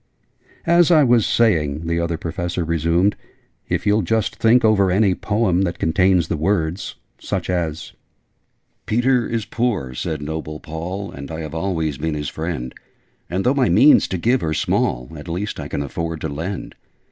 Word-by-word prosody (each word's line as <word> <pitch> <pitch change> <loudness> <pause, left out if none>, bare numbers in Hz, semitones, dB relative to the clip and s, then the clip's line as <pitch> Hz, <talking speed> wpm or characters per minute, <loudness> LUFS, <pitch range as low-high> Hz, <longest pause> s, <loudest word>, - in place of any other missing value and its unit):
"As 170 0 +5
I 160 -4 +6
was 120 -4 +4
saying," 80 -9 +1
the 85 0 0
other 85 -1 -1
Professor 85 +1 -3
resumed, 85 +4 +1 0.5
"if - - -1
you'll 105 +1 +3
just 110 +4 -1
think 115 +1 +4
over 100 -3 +4
any 95 +1 +3
Poem, 105 -2 0
that 85 -3 -1
contains 90 +1 +2
the 80 - -2
words 85 +1 -1 0.2
such - - -3
as, 85 -3 -3 0.9
'Peter 120 +1 +2
is 115 -2 -2
poor,' 110 - -1
said 75 +3 -4
noble 75 0 -5
Paul, 90 +5 -5
'And 70 0 -8
I 80 0 -5
have 80 -1 -6
always 80 -4 -2
been 80 0 -2
his 75 -2 -3
friend: 80 -6 -4 0.6
And, 95 +2 -1
though 125 - +3
my 135 -7 +2
means 115 - +6
to 95 - -3
give 120 +8 +1
are 80 -1 -1
small, 60 -3 0
At 75 +1 -9
least 90 +5 -3
I - - -5
can 70 - -3
afford 80 +2 -4
to 80 - -2
lend. 80 +7 -5
85 Hz, 170 wpm, -21 LUFS, 80-105 Hz, 0.9 s, I